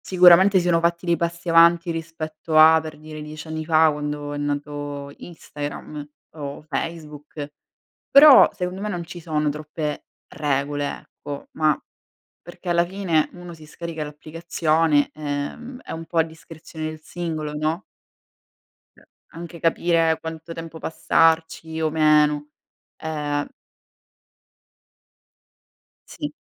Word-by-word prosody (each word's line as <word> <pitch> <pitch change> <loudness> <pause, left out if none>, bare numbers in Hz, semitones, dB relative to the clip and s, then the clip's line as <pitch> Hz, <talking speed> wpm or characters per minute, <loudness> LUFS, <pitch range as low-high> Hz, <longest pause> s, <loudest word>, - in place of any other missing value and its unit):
Sicuramente 185 +2 +7
si 175 - +1
sono 170 -1 +3
fatti 170 +1 0
dei 170 -1 +3
passi 170 +1 -4
avanti 170 +1 +5
rispetto 160 -1 -4
a, 160 +1 +8
per 155 -1 -8
dire, 155 0 -9
10 155 +1 -9
anni 160 0 -4
fa, 160 -1 +5
quando 150 0 -4
è - - -4
nato 145 -1 -4
Instagram 150 -2 -8 0.2
o 145 -2 -7
Facebook, 150 -1 -6 0.6
però, 280 0 +9
secondo 180 +1 -4
me 210 - -3
non 175 -4 -4
ci 175 +1 -9
sono 155 -2 -1
troppe 150 0 -4 0.3
regole, 145 0 -1 0.2
ecco, 145 -1 -9
ma, 155 -2 +1 0.6
perché 175 +1 -11
alla 170 0 +3
fine 175 -4 0
uno 175 -1 -10
si 160 -1 -14
scarica 160 0 -6
l'applicazione, 155 0 0
ehm, 155 - -5
è - - -9
un 165 0 -6
po' 165 +1 -3
a - - +7
discrezione 160 0 -10
del 155 0 -8
singolo, 155 -2 -5
no? 155 +4 -1 1.1
Uhm, - - -21 0.3
anche 170 0 -9
capire 165 -1 +2
quanto 160 +1 -7
tempo 165 -1 -8
passarci 160 0 +1
o 160 - +1
meno, 150 -1 +3 0.5
ehm 150 -2 -3 2.6
Sì. - - -6
160 Hz, 125 wpm, -23 LUFS, 150-170 Hz, 2.6 s, però